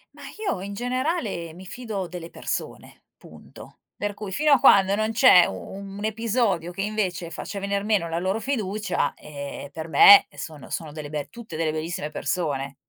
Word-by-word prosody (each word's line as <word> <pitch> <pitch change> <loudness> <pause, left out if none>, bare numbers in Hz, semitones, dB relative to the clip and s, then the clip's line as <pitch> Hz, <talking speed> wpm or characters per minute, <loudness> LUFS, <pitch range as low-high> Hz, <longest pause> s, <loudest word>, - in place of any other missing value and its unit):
Ma - - -13 0.2
io 185 - -1
in 200 +2 -6
generale 245 - -2
mi 185 +2 -12
fido 215 -3 -5
delle 170 -1 -8
persone, - - -6
punto. - - -14 0.2
Per 205 0 -3
cui, 205 -2 -7
fino 300 +7 +2
a 275 - +7
quando 195 0 +6
non 215 +2 0
c'è 220 -7 +7
u - - -4
un 195 - -8
episodio 220 -5 0
che 195 - -4
invece 190 -5 -2
faccia 200 +3 -6
venir 200 0 -2
meno 205 -6 +1
la 165 - -1
loro 190 +5 -1
fiducia, 215 -6 -1
ehm, 140 -1 -8
per 160 +3 -7
me 200 +5 +8
sono 155 -3 -8
sono 160 -2 -4
delle 150 -1 -7
be 145 -2 -4
tutte 230 -5 -10
delle 160 -1 0
bellissime 155 0 -4
persone. 145 -4 -2
195 Hz, 175 wpm, -24 LUFS, 165-215 Hz, 0.2 s, me